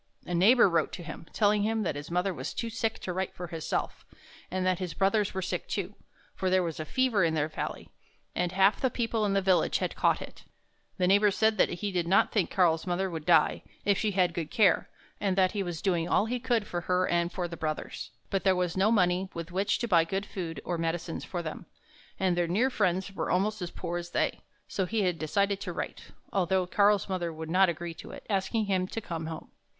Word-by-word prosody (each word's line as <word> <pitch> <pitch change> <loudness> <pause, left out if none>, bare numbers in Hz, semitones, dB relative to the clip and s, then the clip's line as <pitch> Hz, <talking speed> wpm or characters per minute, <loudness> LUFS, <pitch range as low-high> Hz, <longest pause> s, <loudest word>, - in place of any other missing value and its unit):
A 180 - -4
neighbor 210 +8 +6
wrote 165 -4 +1
to 175 - -6
him, 165 - -8
telling 210 -1 +3
him 220 +1 0
that 180 - -1
his 145 +1 -7
mother 180 +2 0
was - - -5
too 230 -1 -3
sick 225 0 -1
to 180 - -3
write 190 +1 -3
for 180 - -5
herself, 165 -2 -3 0.5
and 185 0 -1
that 185 -1 +1
his 180 -4 -4
brothers 200 0 +1
were 190 - -1
sick, 180 -1 -3
too; 200 0 -3 0.4
for 190 - -1
there 185 0 +3
was 165 -2 -4
a 155 - -3
fever 250 -2 +2
in 160 -1 +2
their 150 -1 +1
valley, 155 - -5 0.5
and 175 -1 -1
half 195 +2 +3
the 260 - +3
people 230 -2 -1
in 200 - +1
the 195 -1 +2
village 185 -1 +3
had - - -3
caught - - +2
it. - - -10 0.5
The 185 - +2
neighbor 205 +2 +5
said 220 +2 +2
that - - +5
he 200 +3 -3
did 175 -2 -1
not 190 +3 +4
think 205 -5 +1
Karl's 170 -3 +2
mother 180 +1 0
would 160 -1 -6
die, 165 -3 +4 0.2
if 200 - +4
she 215 +2 0
had 180 -2 +2
good 165 -2 -3
care, 215 -5 +3 0.3
and 195 -2 0
that 185 -1 +4
he 205 - -2
was 175 -3 -4
doing 175 -4 +1
all 205 - +3
he 245 +2 -2
could 240 -4 0
for 175 -3 -3
her 185 +1 +1
and 170 0 +1
for 180 -1 -3
the 170 - -7
brothers, 155 -1 -4 0.2
but 195 - 0
there 190 -1 +4
was 180 -2 -1
no 195 +3 +3
money 185 -3 +2
with 170 +1 -6
which 195 +3 +1
to 235 - -2
buy 170 -6 +5
good 195 +4 -3
food 165 -7 -5
or 175 -2 -2
medicines 165 0 -2
for 175 -2 -4
them, 155 - -6 0.5
and 185 -2 +2
their 175 -1 +1
near 225 +10 +2
friends 190 -3 0
were - - -3
almost 205 +3 +1
as 175 - -3
poor 175 0 -4
as 175 0 -7
they. - - -1 0.3
So 190 -2 -2
he 220 +1 0
had 180 -3 0
decided 200 +5 0
to - - -4
write, - - -5 0.3
although 190 -1 +2
Karl's 205 +2 +3
mother 180 -3 -2
would 160 0 -7
not 190 +1 +5
agree 170 0 -4
to - - -11
it, - - -10
asking 200 +3 0
him 185 -2 0
to 225 - -4
come 165 -6 -5
home. 160 -1 -7
185 Hz, 235 wpm, -29 LUFS, 170-200 Hz, 0.5 s, neighbor